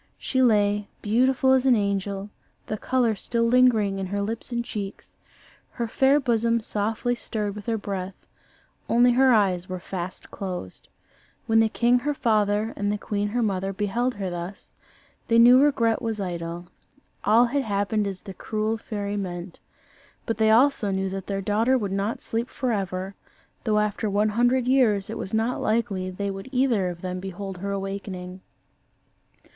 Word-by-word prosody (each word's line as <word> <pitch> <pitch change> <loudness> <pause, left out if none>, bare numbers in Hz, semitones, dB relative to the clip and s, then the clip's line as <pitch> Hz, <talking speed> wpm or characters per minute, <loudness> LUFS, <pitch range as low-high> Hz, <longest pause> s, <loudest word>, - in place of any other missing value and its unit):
She 260 - -1
lay, 205 -3 +3 0.2
beautiful 255 +4 +3
as 265 0 +3
an 255 - +6
angel, 200 -1 -2 0.3
the 215 - -3
colour 245 +1 +1
still 230 +3 -1
lingering 230 -5 +3
in 190 - -3
her 200 +2 -2
lips 220 +5 -4
and 235 0 -2
cheeks; 200 -3 -7 0.6
her 235 -2 -2
fair 270 +5 +3
bosom 235 -3 +1
softly 220 +3 -1
stirred 210 -4 -3
with 210 +2 -10
her 225 -1 +1
breath: 195 -2 -6 0.6
only 245 +1 +5
her 260 +2 +5
eyes 185 -5 +2
were 185 0 -4
fast 180 0 -6
closed. 180 - -6 0.6
When 225 0 +3
the 225 0 +4
king 240 +2 +3
her 295 +3 -2
father 215 -2 +1
and 205 0 -1
the 210 - -1
queen 205 0 -2
her 240 +3 0
mother 195 -2 -1
beheld 230 +5 -1
her 195 -3 -4
thus, 175 +3 -7 0.5
they 230 - +3
knew 245 +3 +8
regret 235 -6 +2
was 225 -3 -3
idle 170 -2 -4 0.6
all 225 +3 +5
had 280 +4 0
happened 205 -2 0
as 190 -2 -6
the 195 - -8
cruel 215 +3 -2
fairy 205 -2 -4
meant. 175 -2 -5 0.7
But 225 - -2
they 220 0 +4
also 230 -1 +4
knew 190 0 -1
that 190 0 -6
their 195 -1 -2
daughter 225 +6 +2
would 205 -5 -3
not 200 +3 -2
sleep 230 +2 -2
for 255 -2 -2
ever, 190 -2 -3 0.5
though 215 -2 +2
after 210 +1 0
one 205 +2 +2
hundred 245 +3 +2
years 230 -7 +3
it - - -5
was 190 - -5
not 225 +3 0
likely 215 -4 0
they 200 +2 -3
would 195 +5 -8
either 250 -8 +2
of 175 -1 -8
them 185 0 -4
behold 190 0 -6
her 200 +2 -4
awakening. 195 -2 -5
210 Hz, 170 wpm, -25 LUFS, 195-235 Hz, 0.7 s, knew